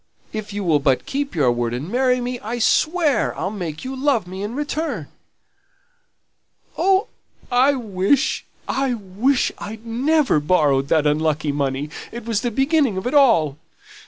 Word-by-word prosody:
If 215 -1 -5
you 205 0 -4
will 160 -5 +3
but 135 -3 +1
keep 280 -4 -3
your 135 -6 +3
word, 120 0 -1
and 135 +6 -5
marry 250 +3 +1
me, 245 0 -3
I'll 235 +3 -4
swear 310 +2 +2
I'll 190 - -2
make 175 - -5
you 265 +1 -4
love 265 -6 +1
me 185 +2 -7
in 210 +4 -4
return." 295 - -3 1.7
"Oh, 385 +2 +3 0.5
I 255 +3 +4
wish 215 +2 0 0.2
I 265 -2 0
wish 220 +6 0
I'd 220 +2 -8
never 265 - +2
borrowed 145 -4 +2
that 155 0 +2
unlucky 150 0 +1
money, 140 +1 -2 0.2
it 235 -1 -8
was 225 -3 0
the 240 - 0
beginning 270 - +1
of 190 - -4
it 250 - -1
all. 220 - +4
220 Hz, 160 wpm, -21 LUFS, -, 1.7 s, I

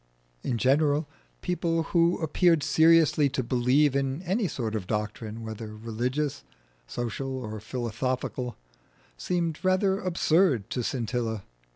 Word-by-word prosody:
In 120 - -1
general, 145 +4 +2 0.3
people 165 -2 0
who 170 0 +4
appeared 165 0 +3
seriously 160 -1 +5
to 130 - -2
believe 130 +4 +3
in 140 +4 -1
any 190 +4 0
sort 115 -8 -3
of 105 -5 -3
doctrine, 105 +1 -3
whether 110 -1 -7
religious, 120 - -2 0.4
social, 125 - -3
or 110 -4 -5
philosophical, 125 +2 -3 0.6
seemed 170 - -1
rather 190 +1 +2
absurd 165 - +2
to 125 - -1
Scintilla. 115 -3 -2
130 Hz, 115 wpm, -27 LUFS, 115-165 Hz, 0.6 s, seriously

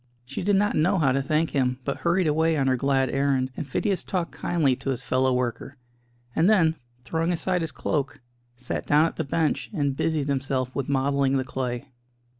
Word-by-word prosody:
She 135 +3 -5
did 200 +2 +2
not 205 +2 +2
know 180 +6 +3
how 145 -6 +3
to 135 +1 +1
thank 155 +3 0
him, 125 -2 +1
but 140 - -2
hurried 175 +2 +1
away 160 +1 +2
on 135 - +1
her 130 -1 +3
glad 135 +1 +1
errand, 135 -2 +1
and 145 - -5
Phidias 195 - -1
talked 180 -3 -2
kindly 155 -7 +1
to - - -5
his 130 -1 -2
fellow 130 0 +1
worker, 125 +2 -2 0.6
and 170 +5 +4
then, 170 -7 +4 0.3
throwing 165 +4 -1
aside 180 +1 0
his 165 -2 -2
cloak, 145 +2 -2 0.4
sat 125 +1 -5
down 150 +2 +5
at 165 - -3
the 160 - 0
bench 155 +2 -1
and 145 -8 -1
busied 155 -1 0
himself 135 -2 -1
with 140 -2 -2
modelling 140 0 +2
the 130 - 0
clay. 130 0 -4
140 Hz, 200 wpm, -25 LUFS, 130-165 Hz, 0.6 s, down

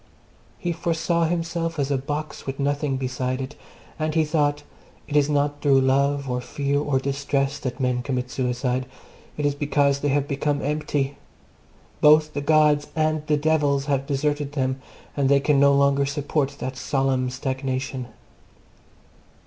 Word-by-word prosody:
He 175 - -2
foresaw 170 0 0
himself 165 0 -2
as 140 -1 -1
a 140 - +2
box 145 +2 -5
with 135 +1 -4
nothing 140 -1 0
inside 130 0 -2
it, 135 +2 -5 0.4
and 155 0 -1
he 160 -1 +3
thought 150 -1 0 0.4
It 145 - -5
is 145 0 +4
not 145 0 0
through 135 -2 +4
love 140 +1 +2
or 125 -1 -2
fear 140 +3 -1
or 145 -2 0
distress 140 +1 -1
that 130 0 -4
men 125 -1 0
commit 125 -1 -3
suicide: 125 0 -1 0.5
it 150 - -1
is 145 - +2
because 140 -1 +1
they 145 - -1
have 145 0 +1
become 145 0 -1
empty: 145 -1 -1 0.8
both 155 0 +6
the 145 - -2
gods 150 0 +3
and 155 -1 +1
the 150 - +3
devils 145 -2 +1
have 140 -1 -1
deserted 145 0 -1
them 130 -2 -1 0.3
and 140 -2 +1
they 140 0 +5
can 140 0 +2
no 140 0 +6
longer 140 0 +3
support 145 0 -1
that 130 -1 -4
solemn 135 -2 0
stagnation. 130 -1 -3
140 Hz, 155 wpm, -24 LUFS, 135-150 Hz, 0.8 s, both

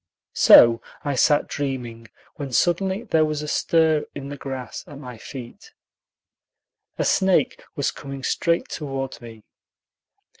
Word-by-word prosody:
So 115 0 +7 0.2
I 145 - -1
sat 145 +3 +3
dreaming, 125 -5 -5 0.3
when 140 -3 -5
suddenly 190 - +1
there 160 -9 +2
was 155 -1 -2
a - - -5
stir 160 -1 +2
in 140 -1 -7
the 145 - -6
grass 130 -4 -7
at 145 - -11
my 125 -5 -10
feet. 130 - -10 1.2
A - - 0
snake 190 -2 +2
was 140 -4 0
coming 135 -1 -9
straight 170 +4 0
toward 135 -4 -5
me. 115 -2 -12
140 Hz, 135 wpm, -23 LUFS, 130-155 Hz, 1.2 s, So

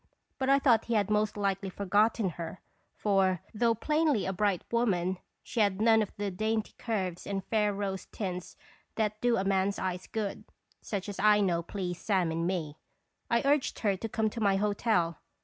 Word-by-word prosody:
But 265 0 0
I 275 - +6
thought 245 -5 +3
he 235 - -1
had 205 -1 +1
most 210 0 +1
likely 195 -1 -1
forgotten 205 +2 +2
her; 170 +2 -7 0.4
for, 190 -3 +1
though 230 +1 +2
plainly 300 -2 +1
a 190 - -1
bright 195 -1 0
woman, 190 -6 +1 0.2
she 235 - -4
had 200 -2 +2
none 220 0 +5
of 210 - -2
the 205 -1 -2
dainty 220 +3 -1
curves 190 -7 -3
and 195 -1 -3
fair 210 -2 +1
rose 195 -1 -3
tints 180 -4 -5 0.4
that 215 -1 -1
do 240 -1 +3
a 190 - 0
man's 195 0 +1
eyes 185 -1 -3
good 215 -3 -3 0.4
such 200 -4 -4
as 200 -2 -6
I 210 +1 +5
know 175 -4 +2
please 175 -1 -5
Sam 185 -6 +1
in 165 +1 -1
me. 160 -5 -3 0.5
I 235 0 +2
urged 285 -1 +2
her 205 -3 +2
to 225 +4 -5
come 220 -1 0
to 230 - -5
my 200 -2 +3
hotel. 200 -4 +1
205 Hz, 185 wpm, -30 LUFS, 185-220 Hz, 0.5 s, I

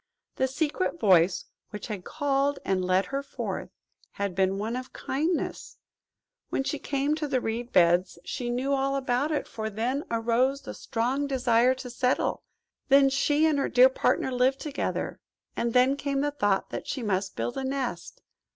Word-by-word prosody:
The 265 - +2
secret 315 +5 -1
voice 180 - +4 0.2
which 210 - -7
had 205 -5 -5
called 285 0 0
and 190 -1 +1
led 185 +1 +2
her 275 - 0
forth, 280 - -5 0.4
had 200 -2 -2
been 190 +1 +1
one 220 +4 -2
of 255 0 -6
Kindness. 315 +6 -2 0.7
When - - 0
she 290 +1 -2
came 280 +1 0
to 305 -1 -2
the 265 -2 +1
reed 235 +1 -3
beds 175 +1 +3
she 245 -1 -3
knew 255 +3 0
all 275 0 +1
about 265 +2 0
it. 300 - -1
For 220 -1 -4
then 240 +7 -2
arose 240 +4 +1
the - - -6
strong 260 +5 -1
desire 250 -2 +3
to 255 -1 -8
settle. 250 +1 0 0.5
Then 275 0 +6
she 290 +3 +2
and 305 -3 +2
her 275 - 0
dear 255 +1 +7
partner 265 0 +1
lived 255 +2 +2
together. 300 -2 -3 0.4
And 235 - 0
then 255 +3 +4
came 280 -1 -1
the 290 0 0
thought 205 -9 0
that - - -5
she 260 - -3
must 190 -2 -1
build 115 +1 -3
a 270 - -3
nest. 265 -2 -4
255 Hz, 175 wpm, -27 LUFS, 225-275 Hz, 0.7 s, dear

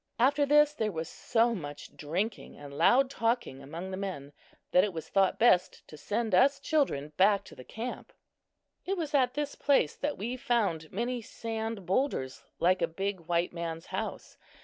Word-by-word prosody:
After 280 +4 +3
this, 295 +1 +5
there 220 -7 -1
was 160 -2 -4
so 235 +4 +1
much 145 -8 -7
drinking 185 +9 -3
and 145 -1 -10
loud 265 - +5
talking 230 - -1
among 165 +7 -7
the 190 - -4
men, 165 -8 -5 0.4
that 180 - +5
it 205 - -1
was 160 -1 -6
thought 195 -1 +2
best 185 -6 +3
to - - -10
send 215 +7 -2
us 275 +9 +5
children 265 - 0
back 200 +1 +4
to - - -13
the 125 - -11
camp. 230 - -6 0.7
It 390 +1 -2
was 315 -4 -3
at 255 -3 +3
this 290 -1 -2
place 270 - +2
that 290 +1 -2
we 235 +6 -3
found 215 - 0
many 240 +4 -2
sand 225 -2 -5
boulders 180 - -1 0.2
like 185 +2 +3
a - - +3
big 195 +3 -3
"white 170 +1 0
man's 165 -1 -5
house." - - -5
210 Hz, 175 wpm, -30 LUFS, 170-250 Hz, 0.7 s, this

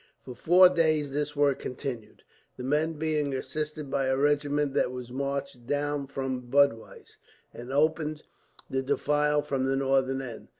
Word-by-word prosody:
For 125 - -7
four 180 +7 +6
days 155 -5 +1
this 145 +1 -2
work 145 -2 +2
continued, 120 -4 -6 0.3
the 125 - -6
men 150 +5 +1
being 150 -3 -1
assisted 150 +1 -4
by 135 -1 0
a 130 0 +1
regiment 145 0 +1
that 135 - +1
was 125 -1 -7
marched 140 -2 -4
down 145 0 -1
from 130 -2 -4
Budweis, 140 -4 +1 0.4
and 120 +2 -8
opened 155 +1 0 0.4
the 135 - -1
defile 150 +2 +1
from 135 -2 -1
the 135 0 +1
northern 135 -1 +1
end. 120 -4 -8
140 Hz, 155 wpm, -28 LUFS, 130-150 Hz, 0.4 s, four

